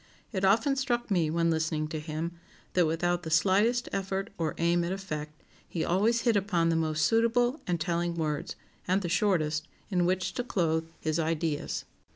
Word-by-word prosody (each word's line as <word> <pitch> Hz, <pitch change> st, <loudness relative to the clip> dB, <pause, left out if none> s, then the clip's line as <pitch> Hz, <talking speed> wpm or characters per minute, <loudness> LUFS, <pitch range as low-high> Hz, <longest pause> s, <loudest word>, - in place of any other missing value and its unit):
It 195 Hz, -4 st, -2 dB
often 225 Hz, +8 st, +4 dB
struck 240 Hz, -4 st, -1 dB
me, 170 Hz, -5 st, +2 dB
when 165 Hz, +1 st, +2 dB
listening 160 Hz, -1 st, 0 dB
to 160 Hz, -1 st, -3 dB
him, 155 Hz, +2 st, -4 dB, 0.4 s
that 175 Hz, -3 st, +4 dB
without 175 Hz, +2 st, 0 dB
the 165 Hz, -, -6 dB
slightest 200 Hz, +9 st, +3 dB
effort 195 Hz, 0 st, -2 dB
or 160 Hz, -4 st, -2 dB
aim 170 Hz, +1 st, +2 dB
at 170 Hz, -, -2 dB
effect, 155 Hz, -6 st, -5 dB, 0.3 s
he 165 Hz, -, -2 dB
always 220 Hz, +7 st, +2 dB
hit 235 Hz, -2 st, +2 dB
upon 185 Hz, -4 st, +2 dB
the 165 Hz, -, +2 dB
most 155 Hz, -1 st, +1 dB
suitable 240 Hz, -, +2 dB
and 175 Hz, -2 st, 0 dB
telling 170 Hz, 0 st, -1 dB
words, 155 Hz, -3 st, -2 dB, 0.3 s
(and 190 Hz, +2 st, +2 dB
the 175 Hz, -, -2 dB
shortest), 165 Hz, -5 st, +1 dB, 0.2 s
in 180 Hz, -2 st, +2 dB
which 185 Hz, 0 st, 0 dB
to 245 Hz, -, -2 dB
clothe 160 Hz, -8 st, 0 dB
his 155 Hz, +1 st, 0 dB
ideas. 160 Hz, -2 st, -1 dB
175 Hz, 180 wpm, -29 LUFS, 160-195 Hz, 0.4 s, often